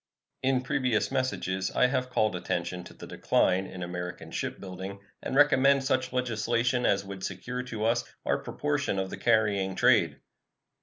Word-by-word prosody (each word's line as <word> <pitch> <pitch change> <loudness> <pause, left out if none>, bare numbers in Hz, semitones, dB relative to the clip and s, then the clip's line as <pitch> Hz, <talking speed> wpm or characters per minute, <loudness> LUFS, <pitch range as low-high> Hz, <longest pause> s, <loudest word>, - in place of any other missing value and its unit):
In 130 -1 +1
previous 125 -4 0
messages 95 -8 -1
I - - +3
have 125 0 0
called 110 -5 +1
attention 90 0 -3
to - - -12
the - - -10
decline 95 +1 +1
in 90 -1 -7
American 90 0 -6
shipbuilding 95 +1 -5 0.2
and - - -4
recommended 140 -1 +5
such 130 -1 +1
legislation 120 0 +1
as 100 0 +2
would 100 -1 -8
secure 125 0 -4
to 115 -4 -4
us 120 +1 +2 0.2
our - - +1
proportion 145 -8 -1
of 95 0 -2
the - - -5
carrying 105 -5 +2
trade. - - +3
115 Hz, 155 wpm, -28 LUFS, 95-130 Hz, 0.2 s, recommended